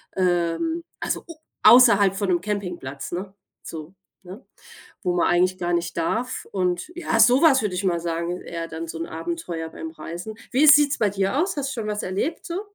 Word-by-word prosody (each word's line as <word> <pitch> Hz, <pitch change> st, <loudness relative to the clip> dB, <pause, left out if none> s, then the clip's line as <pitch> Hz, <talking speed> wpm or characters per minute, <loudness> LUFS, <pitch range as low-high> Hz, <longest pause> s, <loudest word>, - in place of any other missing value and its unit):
Ähm, 185 Hz, -, 0 dB, 0.2 s
also -, -, -3 dB
U 335 Hz, -, -9 dB, 0.3 s
außerhalb 205 Hz, -6 st, +7 dB
von 200 Hz, -1 st, -2 dB
'nem 175 Hz, -2 st, +2 dB
Campingplatz, 180 Hz, -9 st, -5 dB
ne, 190 Hz, +2 st, -5 dB, 0.3 s
so, 160 Hz, +2 st, -9 dB, 0.3 s
ne? 190 Hz, +7 st, -11 dB, 0.6 s
Wo 180 Hz, -2 st, 0 dB
man 175 Hz, -, +2 dB
eigentlich 180 Hz, +1 st, +2 dB
gar 175 Hz, -1 st, -2 dB
nicht 170 Hz, 0 st, -1 dB
darf. 225 Hz, +9 st, -2 dB
Und 180 Hz, -, -1 dB
ja, 340 Hz, -9 st, -1 dB
so 245 Hz, +5 st, +6 dB
was 275 Hz, -7 st, +5 dB
würde 200 Hz, -4 st, -2 dB
ich 180 Hz, -, -2 dB
mal 175 Hz, -2 st, +1 dB
sagen, 170 Hz, +1 st, -3 dB
eher 165 Hz, -1 st, -6 dB
dann 165 Hz, +1 st, -6 dB
so 165 Hz, -, -6 dB
'n 165 Hz, -, -4 dB
Abenteuer 165 Hz, -, -5 dB
beim 320 Hz, -, -7 dB
Reisen. 195 Hz, -, -8 dB, 0.2 s
Wie 275 Hz, +5 st, +4 dB
sieht 295 Hz, -1 st, +7 dB
es -, -, -2 dB
bei 210 Hz, -, +2 dB
dir 195 Hz, +5 st, -1 dB
aus? 365 Hz, -2 st, -1 dB
Hast 275 Hz, -1 st, -2 dB
du 230 Hz, -, -4 dB
schon 215 Hz, -, -4 dB
was 210 Hz, 0 st, -2 dB
erlebt, 200 Hz, -, -3 dB
so? 345 Hz, +2 st, -4 dB
190 Hz, 200 wpm, -23 LUFS, 175-250 Hz, 0.6 s, außerhalb